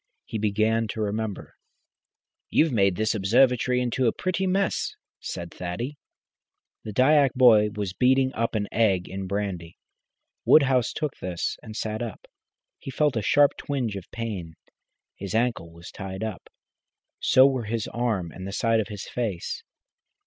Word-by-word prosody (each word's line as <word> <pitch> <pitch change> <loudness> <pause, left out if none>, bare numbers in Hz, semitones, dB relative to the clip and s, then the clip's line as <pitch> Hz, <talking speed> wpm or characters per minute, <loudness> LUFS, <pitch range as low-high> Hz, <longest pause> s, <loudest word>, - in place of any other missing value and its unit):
He 110 - -4
began 110 +2 +1
to 110 - -6
remember. 105 0 -3 1.0
"You've 160 -1 +3
made 100 -5 +2
this 110 +3 0
observatory 125 +4 +3
in 125 -1 -1
a 115 - +4
pretty 185 +5 -2
mess," 195 +1 0 0.2
said 85 0 -6
Thaddy. 90 +10 -5 0.9
The 110 - -6
Dyak 135 +4 +4
boy 115 -5 +6
was 100 -3 -3
beating 130 +3 +3
up 115 0 -1
an 105 -1 -1
egg 100 -6 +2
in 95 0 -5
brandy. 95 -4 -4 0.7
Woodhouse 135 -5 +4
took 150 -3 -3
this 90 -2 -3
and 110 - -10
sat 110 0 -3
up. 115 -5 -6 0.5
He - - -8
felt 145 0 +1
a 110 - 0
sharp 145 +7 +4
twinge 125 -7 -2
of 95 -3 -8
pain. 100 -8 -5 0.6
His 100 +2 -5
ankle 115 -8 0
was 85 +1 -12
tied 95 +1 -6
up, 110 -4 -6 0.7
so 130 - +6
were 130 -4 +1
his 110 0 -2
arm 110 -8 -1
and 95 +3 -8
the 100 - -6
side 115 +1 +2
of 110 - -1
his 105 -3 -7
face. 105 -8 -3
110 Hz, 155 wpm, -25 LUFS, 100-125 Hz, 1.0 s, boy